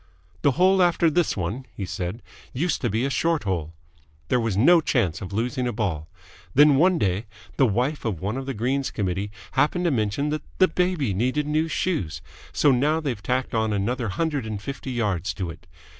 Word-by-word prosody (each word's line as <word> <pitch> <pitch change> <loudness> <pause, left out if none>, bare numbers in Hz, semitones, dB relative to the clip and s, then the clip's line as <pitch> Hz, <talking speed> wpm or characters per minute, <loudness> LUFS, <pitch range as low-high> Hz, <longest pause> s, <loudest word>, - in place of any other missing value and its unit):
"The 140 - +3
hole 185 +5 +4
after 170 -2 +3
this 170 -5 +1
one," 105 +9 -3
he 100 - -3
said, 90 +5 -5 0.3
"used 155 +5 -1
to 120 - 0
be 110 +5 0
a 140 - -1
short 165 +1 +1
hole. 85 -5 -3 0.5
There 125 - +3
was 115 -5 -1
no 165 +10 +6
chance 95 - 0
of 95 - -6
losing 125 +5 -1
a - - 0
ball. 90 -9 -2 0.5
Then, 145 0 +7
one 180 +4 +4
day, 100 - 0 0.3
the 135 - +5
wife 125 +8 -1
of 105 -8 -2
one 100 +6 -2
of 135 0 -5
the 135 - -3
Greens 130 +5 0
Committee 100 0 -2 0.2
happened 150 +6 +1
to 170 - +3
mention 115 +4 0
that 155 0 -2 0.2
the 185 - +6
baby 175 - 0
needed 130 +9 0
new 155 +2 +1
shoes, 85 - -2 0.3
so 145 - +3
now 145 +5 +2
they've 135 -9 -3
tacked 130 +3 -1
on 110 -1 +1
another 115 +4 -1
hundred 145 - -1
and 105 -2 -4
fifty 135 +4 -6
yards 100 -9 -1
to 90 -2 -3
it. - - -15
125 Hz, 200 wpm, -24 LUFS, 100-150 Hz, 0.5 s, Then